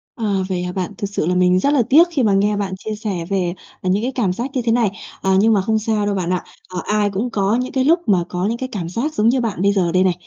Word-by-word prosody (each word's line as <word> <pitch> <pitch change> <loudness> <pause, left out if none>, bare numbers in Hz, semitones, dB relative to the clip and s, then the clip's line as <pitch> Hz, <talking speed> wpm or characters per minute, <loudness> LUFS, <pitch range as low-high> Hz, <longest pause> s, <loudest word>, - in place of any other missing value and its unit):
À, 230 - -6 0.3
vậy 180 -1 -1
hả 180 - -3
bạn? 185 +1 -3
Thực 200 - -3
sự 200 - -2
là 180 +2 0
mình 180 0 +3
rất 280 +9 +2
là 270 -5 +3
tiếc 325 +6 +7
khi 285 -6 0
mà 210 -3 +3
nghe 205 +1 +2
bạn 195 -2 -2
chia 215 +3 -5
sẻ 200 -6 -4
về, 185 -3 0 0.3
ờ, 185 - -2
những 200 +4 +1
cái 255 - -1
cảm 205 -8 +1
giác 240 +8 -4
như 260 - 0
thế 230 -1 0
này. 230 -2 +3 0.3
À, 190 - +1
nhưng 220 +2 +4
mà 200 - +3
không 220 +3 0
sao 215 -1 0
đâu, 205 -1 0
bạn 180 -3 -2
ạ. 180 -1 -1 0.3
À, 180 - -2
ai 210 -1 +1
cũng 200 +5 -2
có 200 -1 +1
những 250 +1 -2
cái 265 -1 +1
lúc 330 +6 +4
mà 185 -4 +3
có 180 +1 -2
những 225 +3 -1
cái 255 +1 -5
cảm 175 -6 -4
giác 255 - -2
giống 225 -6 +3
như 255 +1 +2
bạn 215 -7 -2
bây 200 +1 +4
giờ 185 -4 +1
đây 185 +2 +3
này. 185 -1 +3
205 Hz, 315 wpm, -19 LUFS, 185-235 Hz, 0.3 s, tiếc